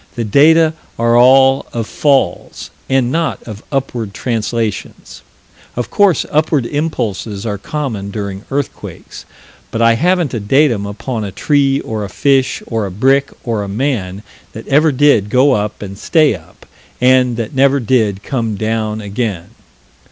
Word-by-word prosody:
The 120 - -2
data 155 +8 +4 0.2
are 115 0 +2
all 135 +2 +5
of 115 -2 -2
falls 135 -9 -1 0.2
and 130 -2 +1
not 165 +2 -1
of 110 -2 -9
upward 120 -7 -3
translations. 115 -3 -4 0.5
Of 125 - -4
course 200 -4 +3
upward 150 -4 +1
impulses 115 - -3
are 105 -3 -3
common 115 -7 -4
during 100 -1 -5
earthquakes, 140 0 -6 0.4
but 115 - -4
I 115 0 +5
haven't 175 +3 +1
a 115 - -2
datum 115 -1 +2
upon 110 +3 -4
a 100 - -5
tree 140 +3 +1
or 110 -1 -4
a 100 - -5
fish 135 +4 +1
or 110 -3 -2
a - - -7
brick 135 +8 +2
or 115 -4 -2
a 100 - -4
man 100 -4 -2 0.3
that 110 - -9
ever 150 +3 +4
did 130 -7 +3
go 130 +5 +4
up 105 -3 -2
and 100 -1 -7
stay 155 - +2
up 80 -5 -13 0.3
and 125 -1 +3
that 115 +1 -4
never 140 +1 +3
did 110 -5 0
come 115 -6 -2
down 110 0 -2
again. 100 -4 -4
120 Hz, 150 wpm, -15 LUFS, 105-140 Hz, 0.5 s, all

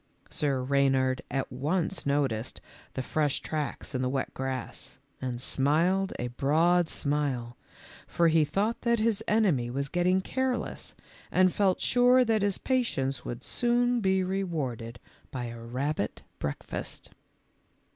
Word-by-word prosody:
Sir 135 -3 0
Reynard 135 -1 +2
at 135 -1 -2
once 155 +7 -1
noticed 135 -5 0 0.4
the 130 - -2
fresh 150 +1 0
tracks 150 -1 -4
in 130 - -1
the 125 - 0
wet 135 0 -2
grass, 130 -2 -5 0.2
and 125 -2 -3
smiled 165 +9 +2
a 125 - -3
broad 160 +7 +2
smile, 140 -5 -1 0.5
for 170 - +2
he 160 -1 +4
thought 205 +9 -1
that 235 -1 +2
his 220 -2 +1
enemy 185 - +2
was 140 +2 -2
getting 180 +3 +2
careless 260 +5 -2 0.4
and 185 0 +4
felt 195 -3 +2
sure 250 +1 +5
that 220 -2 +2
his 200 -1 +1
patience 135 - 0
would 120 +1 -5
soon 245 0 +2
be 190 -1 +2
rewarded 150 -12 -3 0.3
by 125 -2 -4
a 115 -1 -6
rabbit 125 +1 -3 0.2
breakfast. 70 - -5
150 Hz, 135 wpm, -29 LUFS, 130-190 Hz, 0.5 s, sure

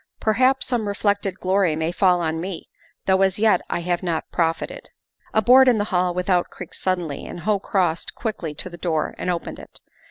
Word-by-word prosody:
Perhaps 255 +5 +2
some 240 -4 -1
reflected 200 -2 0
glory 185 -3 +2
may 160 +1 -1
fall 180 -1 +3
on 160 0 -1
me, 185 -1 -6 0.4
though 190 0 +3
as 190 0 +2
yet 210 -4 +3
I - - -1
have 175 0 -1
not 170 -3 -3
profited 165 -1 -2 0.4
A 220 - +2
board 260 +4 +7
in 245 -3 +5
the 205 - +1
hall 180 0 +2
without 180 -1 +1
creaked 180 - -9
suddenly 175 -6 -2
and 175 - -8
ho 210 0 +1
crossed 180 -4 -1
quickly 180 -9 -4
to 155 - -6
the 175 - -9
door 160 -2 -1
and - - -2
opened 175 -2 -3
it. - - -13
185 Hz, 195 wpm, -22 LUFS, 170-205 Hz, 0.4 s, board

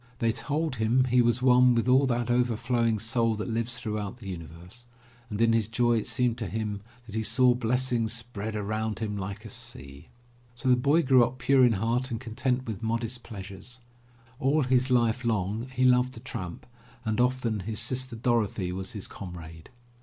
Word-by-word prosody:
They 115 -1 +1
told 145 +3 -2
him 115 +4 +3
he 125 0 +4
was 120 +1 +1
one 125 -1 +6
with 115 +1 +1
all 130 +2 +5
that 120 -1 0
overflowing 120 -1 +1
Soul 115 +1 0
that 105 - -4
lives 115 +1 -2
throughout 105 -2 -4
the 110 -5 -11
universe, 90 - -9 0.4
and 105 -2 -4
in 115 0 +4
his 115 -2 +2
joy 120 0 +2
it - - -6
seemed 125 -2 0
to 110 - -3
him 105 0 -3 0.2
that 110 - -12
he 110 - -1
"saw 125 +3 +4
blessings 120 -1 0
spread 110 -2 -4
around 110 +1 -2
him 110 -2 -3
like 100 0 -6
a - - -7
sea." 70 +4 -5 0.5
So 125 +2 -2
the 125 - +7
boy 145 +7 +3
grew 130 -3 +5
up 125 +2 -2
pure 130 +1 +4
in 120 -2 +5
heart 115 +5 0
and 115 -3 -3
content 125 +2 -2
with 110 -2 -5
modest 115 +2 -2
pleasures. 100 +3 -9 0.6
All 140 +3 +2
his 130 0 +2
life 120 0 +2
long 110 +1 -1
he 130 0 0
loved 125 0 +4
to - - -8
tramp 115 -9 -7 0.4
and 110 +2 +1
often 125 -3 0
his 105 +2 -2
sister 130 +2 +1
Dorothy 110 -6 0
was 95 +1 -5
his 105 -3 -5
comrade. 85 -3 -9
115 Hz, 190 wpm, -27 LUFS, 110-125 Hz, 0.6 s, the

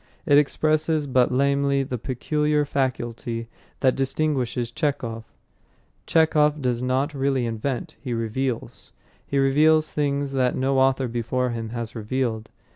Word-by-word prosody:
It 145 -3 +6
expresses 155 +1 +1
but 130 -2 +2
lamely 140 +1 +2
the 130 -2 -4
peculiar 150 +4 0
faculty 120 -4 -3 0.3
that 130 -2 +3
distinguishes 135 -3 -1
Chekhov. 120 -6 -2 0.8
Chekhov 155 -2 +3
does 125 -3 -1
not 130 +4 0
really 135 -2 0
invent. 115 +3 -3
He 130 - -5
reveals. 115 -1 -3 0.3
He 140 - -1
reveals 155 +3 +4
things 140 -1 -1
that 130 -2 +1
no 135 +1 +1
author 135 0 +2
before 120 +2 -1
him 115 -1 -4
has 115 -1 -5
revealed. 110 0 -2
130 Hz, 125 wpm, -24 LUFS, 120-145 Hz, 0.8 s, It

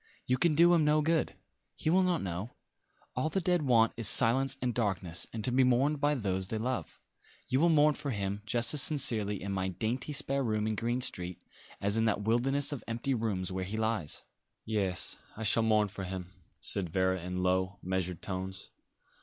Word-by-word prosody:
"You 125 0 0
can 165 -1 +3
do 170 +3 +6
him 165 -2 +4
no 150 0 +3
good. 160 +1 0 0.4
He 155 - -1
will 185 +2 +4
not 180 -2 +1
know. 95 +5 -5 0.6
All 130 +5 0
the 195 - -1
dead 180 -1 +1
want 115 -5 +3
is 115 -3 +2
silence 135 +3 +3
and 125 -2 -1
darkness, 95 -7 -1
and 110 -2 -5
to 125 - -1
be 130 +2 +4
mourned 135 +4 +2
by 145 0 +2
those 95 -6 -1
they 110 - -3
love. 115 -6 -4 0.5
You 130 - +1
will 170 +3 +4
mourn 150 -1 +5
for 145 - -6
him 100 -3 -3
just 115 +2 +5
as 150 - +6
sincerely 110 -10 +3
in 100 - -5
my 95 -1 -1
dainty 115 - -3
spare 140 -1 -1
room 110 -3 -1
in 110 - 0
Green 120 +3 -1
Street 90 -7 -5 0.4
as 100 +2 0
in 110 - +2
that 105 -1 0
wilderness 135 +6 +1
of 140 -6 -5
empty 120 +4 -2
rooms 100 -6 -2
where 95 0 -3
he 100 +4 -5
lies." 110 -9 -2 0.4
"Yes, 100 -5 -1 0.2
I 110 - -5
shall 110 +1 +3
mourn 110 -2 +3
for 100 0 -8
him," 90 0 -6 0.3
said 95 -4 -1
Vera 95 +1 0
in 90 +1 -4
low, 95 +1 0
measured 90 -1 -3
tones. 95 0 -5
110 Hz, 200 wpm, -31 LUFS, 95-135 Hz, 0.6 s, do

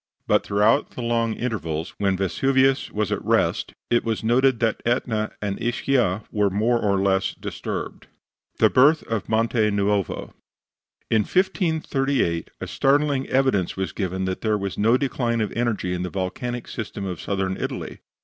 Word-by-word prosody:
But - - +3
throughout 105 +7 +2
the 125 - -4
long 115 -1 +1
intervals 85 -9 -3
when 100 -2 +1
Vesuvius 135 +8 +2
was 105 -1 -2
at - - -2
rest - - +1 0.2
it 120 - +3
was 110 -2 -2
noted 125 +2 +3
that 115 -2 0
Etna 115 -3 0
and 100 +1 -3
Ischia 120 -4 +1
were 105 -1 +2
more 110 +5 +1
or 100 -3 +1
less 95 0 +1
disturbed. - - -6 0.5
THE - - +4
BIRTH 150 +5 +5
OF 110 -2 -3
MONTE 115 +1 +1 0.2
NUOVO 100 -2 -1 0.8
In 110 - +4
1538 140 - 0
a - - -4
startling 140 -1 +1
evidence 130 -11 +1
was 95 0 -2
given 95 -1 -2
that 95 0 -3
there 110 -1 +1
was 100 -1 -4
no 115 +4 +3
decline 125 -4 -1
of 105 -2 -1
energy 115 -6 -1
in 90 - -2
the 90 - -3
volcanic 115 +7 -4
system 110 -3 -5
of 90 -4 -5
Southern 95 -1 -1
Italy. - - -5
110 Hz, 160 wpm, -23 LUFS, 100-125 Hz, 0.8 s, BIRTH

